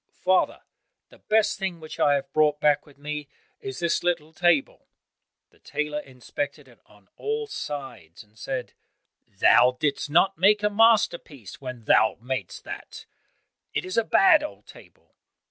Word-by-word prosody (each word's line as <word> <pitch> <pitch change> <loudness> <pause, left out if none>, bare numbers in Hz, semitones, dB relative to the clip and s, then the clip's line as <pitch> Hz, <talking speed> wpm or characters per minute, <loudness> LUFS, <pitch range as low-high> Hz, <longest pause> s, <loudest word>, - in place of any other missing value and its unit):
"Father, 185 0 +1 0.5
the - - -19
best 215 -1 +1
thing 190 -3 -3
which 155 -1 -10
I 145 -1 +4
have 140 - -4
brought 150 -1 +2
back 150 -1 +2
with 145 - -19
me 150 0 -6 0.3
is 130 -1 -7
this 170 -1 0
little 160 -3 -2
table." 175 -4 +1 0.6
The - - -27
tailor 150 0 -3
inspected 140 +1 -6
it 120 -3 -20
on 105 -2 -23
all 445 +1 -2
sides 135 - -7
and 105 0 -30
said, 125 +2 -5 0.5
"Thou 125 0 +4
didst 145 -1 -1
not 180 +5 +3
make 205 +3 +4
a 210 - +2
masterpiece 200 - +1
when 125 -3 -7
thou 110 - +4
mad'st 125 -5 -5
that; - - -9 0.7
it - - -1
is 185 - -5
a 230 - +3
bad 360 - +5
old 300 - -8
table." - - -18
150 Hz, 155 wpm, -25 LUFS, 130-190 Hz, 0.7 s, bad